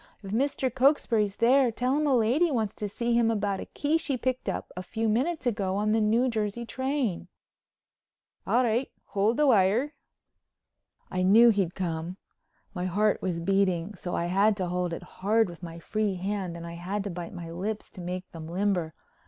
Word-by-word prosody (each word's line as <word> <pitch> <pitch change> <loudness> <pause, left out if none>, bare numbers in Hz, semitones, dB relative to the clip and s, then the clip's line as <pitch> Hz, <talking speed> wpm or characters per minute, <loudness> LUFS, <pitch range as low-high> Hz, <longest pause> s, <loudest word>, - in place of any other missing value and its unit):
If 195 - -7
Mr. 260 +2 0
Cokesbury's 245 -6 +2
there 255 +1 +4
tell 250 +4 0
him 300 0 +1
a 275 - +4
lady 250 +9 +3
wants 220 -7 -1
to 210 - -3
see 235 +4 -1
him 235 -1 +3
about 205 -3 0
a - - -7
key 305 +3 0
she 280 -5 -1
picked 255 +1 -2
up - - -4
a 180 - -4
few 225 +4 -2
minutes 260 +7 0
ago 200 -5 0
on 210 +1 +1
the 220 0 +3
New 225 +4 +3
Jersey 220 0 -2
train." 260 -7 -2 1.2
"All 250 - +3
right. 240 +2 0 0.2
Hold 210 +4 +1
the 300 - +4
wire." 235 +4 +3 1.2
I 185 - -1
knew 220 +6 +7
he'd 195 -5 +1
come. 170 0 -3 0.6
My 180 -2 -3
heart 205 +4 +1
was 180 -3 -2
beating 190 0 +1
so 180 -2 -5
I 170 - -1
had 200 +4 +3
to 185 -3 -2
hold 180 0 -1
it 170 - -5
hard 215 +5 +1
with 175 -1 -10
my 165 -2 -7
free 205 +3 -1
hand 185 -2 -3
and 170 - -8
I 170 - -7
had 185 +4 -3
to 200 - -4
bite 175 0 -7
my 170 -2 -7
lips 205 +5 -4
to 190 - -10
make 180 +1 -5
them 160 -1 -8
limber. 180 -2 -1
205 Hz, 195 wpm, -27 LUFS, 180-235 Hz, 1.2 s, knew